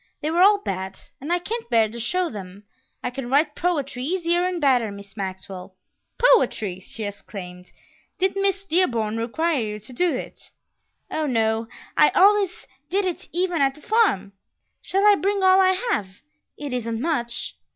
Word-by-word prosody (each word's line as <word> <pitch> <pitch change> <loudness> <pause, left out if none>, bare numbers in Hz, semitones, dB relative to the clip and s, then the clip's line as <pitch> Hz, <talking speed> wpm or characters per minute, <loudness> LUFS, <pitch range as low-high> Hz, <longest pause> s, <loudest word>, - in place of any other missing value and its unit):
They 305 - -2
were 345 +2 +2
all 405 +2 +7
bad, 190 - -5 0.2
and 295 +5 -4
I 350 - +4
can't 450 +6 -5
bear 225 -2 +4
to 230 +2 -8
show 360 +10 0
them; 195 -1 -9 0.4
I 250 - -2
can 250 -1 -6
write 295 +3 +3
poetry 290 -8 -1
easier 345 +2 +1
and 365 -1 -1
better, 250 -7 +2
Miss 200 0 -11
Maxwell." 190 -1 -6 0.4
"Poetry!" 235 - +3
she 215 +4 -8
exclaimed. 190 -3 -8 0.5
"Did 380 +1 +1
Miss 395 0 0
Dearborn 235 - +1
require 300 +7 0
you 210 -1 -4
to 215 +5 -10
do 350 +7 +2
it?" - - -8 0.6
"Oh, 310 -1 -1
no; 225 -2 +1 0.3
I 300 - +6
always 395 -1 +4 0.2
did 390 +2 +1
it 360 -2 -4
even 350 -2 0
at 270 -1 +2
the 300 - -15
farm. 400 - +2 0.5
Shall 390 +2 0
I 415 - +8
bring 395 +2 0
all 375 0 +6
I 375 0 +5 0.2
have? 205 - 0 0.5
It 285 -3 -5
isn't 230 -2 -2
much." 240 -5 -2
280 Hz, 170 wpm, -23 LUFS, 220-365 Hz, 0.6 s, I